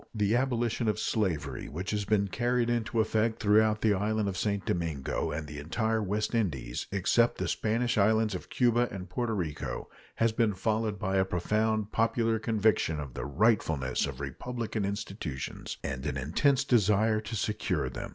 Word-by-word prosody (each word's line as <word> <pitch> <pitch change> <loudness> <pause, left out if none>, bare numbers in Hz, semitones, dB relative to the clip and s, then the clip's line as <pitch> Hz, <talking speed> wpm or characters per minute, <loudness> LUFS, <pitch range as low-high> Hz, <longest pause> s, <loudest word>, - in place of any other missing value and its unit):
The 105 +1 +2
abolition 120 -2 0
of 105 - +1
slavery, 100 -8 -1
which 90 +6 -4
has 105 -1 -1
been 100 -1 +2
carried 120 +3 0
into 115 -1 0
effect 110 +1 0
throughout 110 +1 +3
the 110 -2 +4
island 105 +2 0
of 95 - -4
St. 100 -1 -1
Domingo 80 -6 -1
and 75 +1 -3
the 75 0 -7
entire 110 +9 0
West 105 +3 -1
Indies, 70 - -1
except 100 +5 +2
the - - -2
Spanish 115 +1 0
islands 110 +1 +3
of 90 - -6
Cuba 120 -1 +3
and 95 -2 -7
Porto 115 +4 -1
Rico, 85 -7 -4 0.2
has 115 0 +2
been 110 -2 +1
followed 110 +1 0
by 95 0 -1
a 95 - +4
profound 105 +4 0
popular 115 0 +1
conviction 110 -8 +1
of 70 -4 -6
the - - -4
rightfulness 80 - +1
of 70 -2 -7
republican 110 - -3
institutions 95 -8 -5
and 65 0 -4
an 70 -1 -2
intense 130 - +2
desire 110 -3 +3
to 110 +1 -6
secure 100 -8 -1
them. 65 - -6
105 Hz, 170 wpm, -29 LUFS, 90-115 Hz, 0.2 s, the